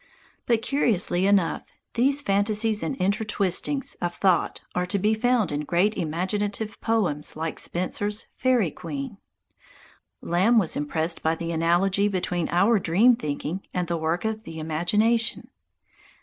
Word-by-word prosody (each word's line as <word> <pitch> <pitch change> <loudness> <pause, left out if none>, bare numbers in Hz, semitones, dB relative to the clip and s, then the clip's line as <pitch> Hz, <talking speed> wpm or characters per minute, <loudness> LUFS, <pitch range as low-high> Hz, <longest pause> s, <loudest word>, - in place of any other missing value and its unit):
But 230 -2 +2
curiously 200 -9 +1
enough, 200 -4 +2 0.3
these 275 +4 +2
fantasies 210 +1 +1
and 275 - -2
inter 200 +1 0
twistings 210 +7 0
of 175 0 -2
thought 185 -4 +1
are 180 0 -1
to 200 - 0
be 210 +3 +2
found 240 -2 +1
in 145 - -1
great 180 +7 +1
imaginative 200 +5 -2
poems 190 -10 0
like 160 +1 -3
Spenser's 205 +4 -2 0.2
"Færie 245 - +2
Queene." 275 -8 -6 1.0
Lamb 190 +8 +2
was 190 -7 +2
impressed 160 +3 -1
by 160 +1 +1
the 170 0 -4
analogy 175 +5 +2
between 180 -3 -2
our 200 +6 +3
dream 205 +9 +4
thinking 150 +1 -4
and 180 -1 -1
the 170 - -1
work 165 +4 -1
of 220 0 -2
the 165 -7 -9
imagination. 210 +9 0
195 Hz, 140 wpm, -25 LUFS, 170-220 Hz, 1.0 s, dream